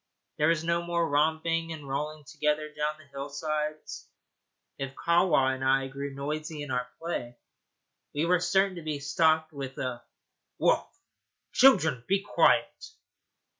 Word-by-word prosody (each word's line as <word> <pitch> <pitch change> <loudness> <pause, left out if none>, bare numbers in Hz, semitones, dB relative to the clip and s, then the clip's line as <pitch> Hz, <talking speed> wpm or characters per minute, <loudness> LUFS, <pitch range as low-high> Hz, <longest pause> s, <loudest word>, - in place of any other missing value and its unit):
There 150 - +4
was 165 -1 +2
no 170 +1 +1
more 170 -1 0
romping 160 +2 +1
and 150 -3 -7
rolling 150 +3 -3
together 150 +1 -1
down 150 0 -2
the 155 - -16
hillsides. 150 +2 -4 0.7
If 135 0 -5
Kahwa 170 -6 +3
and 130 0 -5
I 135 0 +2
grew 140 +1 -5
noisy 150 +2 -4
in 145 - -6
our 125 0 -1
play, 120 -8 -4 0.8
we 150 +3 +1
were 180 +1 +3
certain 190 +1 +2
to - - -6
be 155 -2 -3
stopped 155 +2 +2
with 135 -2 -6
a 125 -2 -3 0.6
'Woof, - - +2 0.6
children! 170 - +5
be 195 +1 +3
quiet.' 440 - +2
155 Hz, 140 wpm, -28 LUFS, 140-165 Hz, 0.8 s, children